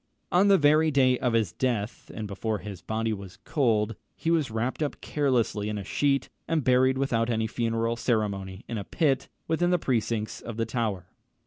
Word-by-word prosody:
On 185 +3 +5
the 200 -1 +7
very 155 +1 +4
day 130 -3 +3
of 125 -2 0
his 110 -6 +2
death, 115 -2 -2
and 110 - -5
before 105 +2 -2
his 100 -3 -8
body 110 0 -1
was 100 -3 -8
cold, 115 -6 +1 0.2
he 165 - -1
was 160 -6 +2
wrapped 115 +6 -2
up 150 - -2
carelessly 120 -7 0
in 105 - -2
a 100 - -4
sheet, 140 +5 +1 0.2
and 160 -3 +1
buried 130 +1 +4
without 120 -4 +1
any 110 -1 +1
funeral 115 +1 -1
ceremony 100 -5 -1
in 115 - -3
a - - -4
pit 135 - 0 0.2
within 170 +2 +1
the 180 - +4
precincts 115 -6 -1
of 115 -2 -7
the 115 - 0
Tower. 110 -6 -2
115 Hz, 190 wpm, -27 LUFS, 110-135 Hz, 0.2 s, the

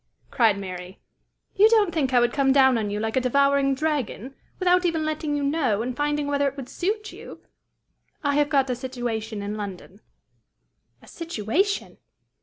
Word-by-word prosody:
cried 225 -4 +3
Mary; 185 -1 -8 0.5
"you 420 +2 +6
don't 425 -6 +3
think 280 -5 0
I 250 - +5
would 240 0 +2
come 275 -2 +2
down 265 -2 +5
on 210 -2 -2
you 205 +1 -3
like 220 +1 -2
a 260 - +2
devouring 275 +1 +2
dragon, 270 -4 -2 0.2
without 365 -1 +3
even 330 -3 0
letting 305 -1 -2
you 285 - -2
know, 275 -8 0
and 250 0 -4
finding 295 +1 -1
whether 285 0 +1
it 275 +1 -4
would 260 -2 -7
suit 420 +4 -3
you! - - -11 0.8
I 285 -1 +1
have 295 0 +2
got 270 -4 +2
a - - -1
situation 235 -4 -4
in 205 +1 -4
London." 200 0 -8 1.0
"A - - -17
situation!" 335 - -2
275 Hz, 175 wpm, -24 LUFS, 225-305 Hz, 1.0 s, you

